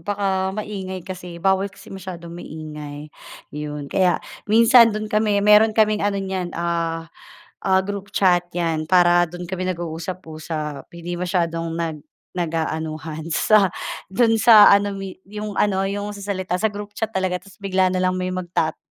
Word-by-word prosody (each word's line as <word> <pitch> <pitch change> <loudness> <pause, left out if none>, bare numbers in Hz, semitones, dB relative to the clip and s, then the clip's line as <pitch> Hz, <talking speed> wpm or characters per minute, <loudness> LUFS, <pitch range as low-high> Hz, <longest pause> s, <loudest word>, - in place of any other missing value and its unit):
Baka 190 +1 -1
maingay 190 -4 -5
kasi 180 -2 -8
bawal 190 +2 +1
kasi 195 - -14
masyadong 175 -3 -8
maingay, 150 -3 -8 0.4
'yon. 150 -1 -6
Kaya 185 -2 +3 0.3
minsan 230 +2 +7
dun 215 -1 -3
kami, 210 -2 +1
meron 210 +1 +6
kaming 215 -1 +3
ano 205 0 0
niyan, 190 -2 -3
ah, 165 -1 -2 0.5
ah 190 0 +4
group 200 +1 -6
chat 180 -2 +3
'yan 165 -2 -1
para 175 0 +5
do'n 175 +1 -8
kami 185 -1 -3
nag-uusap-usap, 160 -4 -5
hindi 175 +1 -5
masyadong 170 -2 -1
nag 165 -2 -3 0.4
nag-aanuhan 160 -1 -3
sa 205 -2 +4 0.4
do'n 225 +1 +3
sa 220 -2 +8
ano 200 0 +4
mi 195 -1 -7
'yong 210 +1 -6
ano, 195 -1 +1
'yong 205 +1 -4
sa 200 - -9
salita 190 -2 -3
sa 220 - +3
group 205 0 -8
chat 225 0 -2
talaga 185 -3 -1
tapos 190 -1 -17
bigla 190 -2 +1
na 185 - -1
lang 185 0 +1
may 185 0 -2
magtat 175 -3 -2
185 Hz, 155 wpm, -22 LUFS, 170-200 Hz, 0.5 s, sa